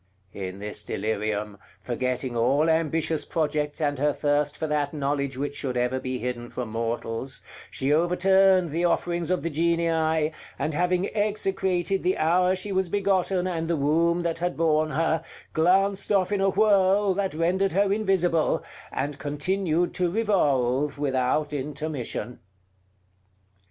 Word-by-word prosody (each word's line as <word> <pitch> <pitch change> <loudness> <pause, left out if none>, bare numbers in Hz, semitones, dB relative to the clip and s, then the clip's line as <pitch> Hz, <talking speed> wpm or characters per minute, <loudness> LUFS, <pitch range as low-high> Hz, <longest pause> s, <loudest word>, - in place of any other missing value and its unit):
In 95 -1 -6
this 105 +1 -5
delirium, 105 -1 -3 0.2
forgetting 125 0 -2
all 140 +7 +3
ambitious 160 0 0
projects 150 -2 -1
and 145 -3 0
her 145 +1 +2
thirst 145 0 0
for 160 - -2
that 150 -1 -1
knowledge 140 -2 -1
which 145 +1 -3
should 130 -4 -3
ever 125 +2 0
be 130 0 -3
hidden 120 -1 -4
from 125 -3 -5
mortals, 115 +2 -3 0.3
she 135 +2 0
overturned 185 +1 +3
the 165 +3 -1
offerings 175 -1 0
of 185 - 0
the 165 - -2
Genii, 160 -1 +1 0.3
and 155 - -2
having 180 +5 0
execrated 195 -3 0
the 185 +1 +1
hour 180 +4 +3
she 190 +2 -3
was 190 -2 0
begotten 190 -1 +1
and 165 -3 -2
the 170 -1 0
womb 165 +4 +2
that 165 -1 -2
had 175 +1 -2
borne 155 -1 +2
her, 160 +1 0 0.3
glanced 195 +5 +2
off 195 -1 +2
in 200 -1 +1
a 195 - +3
whirl 200 -1 +3
that 190 -3 -2
rendered 185 +4 +1
her 200 +1 +3
invisible, 185 -6 +1 0.3
and 140 +1 -3
continued 170 +4 0
to 180 -1 0
revolve 145 - +1
without 140 +1 0
intermission. 140 -4 -4
160 Hz, 145 wpm, -25 LUFS, 140-185 Hz, 0.3 s, all